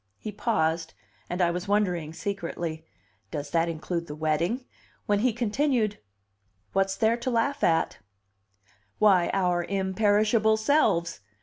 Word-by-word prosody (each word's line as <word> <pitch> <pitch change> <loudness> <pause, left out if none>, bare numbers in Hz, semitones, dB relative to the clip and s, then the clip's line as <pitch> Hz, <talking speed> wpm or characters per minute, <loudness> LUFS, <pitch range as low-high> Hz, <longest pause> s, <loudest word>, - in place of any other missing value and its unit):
He 215 - -6
paused, 165 -7 -1 0.3
and 180 +1 0
I 170 - +3
was 180 +2 -4
wondering 180 -6 0
secretly, 170 -3 -4 0.4
"Does 145 +3 -5
that 165 0 +2
include 170 +1 -3
the 150 - -6
wedding?" 165 - -1 0.4
when 205 -1 +2
he 250 +3 +2
continued: 235 -1 0 0.7
"What's 195 0 +1
there 225 +1 +2
to 240 +2 -3
laugh 255 +4 0
at?" 165 -1 +2 1.0
"Why, 190 -5 +4
our 180 -2 +1
imperishable 210 +3 +2
selves! 220 - +2
195 Hz, 125 wpm, -27 LUFS, 170-220 Hz, 1.0 s, Why